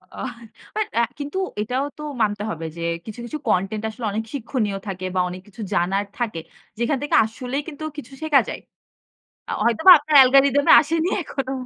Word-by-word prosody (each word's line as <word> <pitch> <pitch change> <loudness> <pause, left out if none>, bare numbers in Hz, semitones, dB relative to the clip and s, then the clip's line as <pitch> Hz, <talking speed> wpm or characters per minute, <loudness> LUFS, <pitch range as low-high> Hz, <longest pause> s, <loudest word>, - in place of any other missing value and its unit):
অহ 260 -2 -5 0.4
but 430 -1 0
আ - - +3 0.2
কিন্তু 290 +5 -5 0.2
এটাও 250 +6 -1
তো - - -9 0.2
মানতে 205 -1 0
হবে 165 0 -5
যে - - -6 0.2
কিছু, 220 +1 -8
কিছু 270 +6 -5
কনটেন্ট 210 +2 0
আসলে 225 +1 -7
অনেক 220 +2 -2
শিক্ষণীয় 230 -6 -2
থাকে 185 -1 -5
বা - - +2
অনেক 180 +1 -8
কিছু 210 +2 -11
জানার 195 +4 +1
থাকে। 225 -8 -2 0.4
যেখান 240 +4 +1
থেকে 290 - 0
আসলেই 250 +5 -4
কিন্তু 310 -1 -8
কিছু 275 -2 -9
শেখা 300 -3 +4
যায়। - - -5 0.9
আ - - -3
হয়তোবা 235 - +7
আপনার 300 +1 -3
অ্যালগরিদমে 275 +2 +6
আসেনি 325 +3 0
এখনো। 270 -3 -4
245 Hz, 175 wpm, -22 LUFS, 210-285 Hz, 0.9 s, হয়তোবা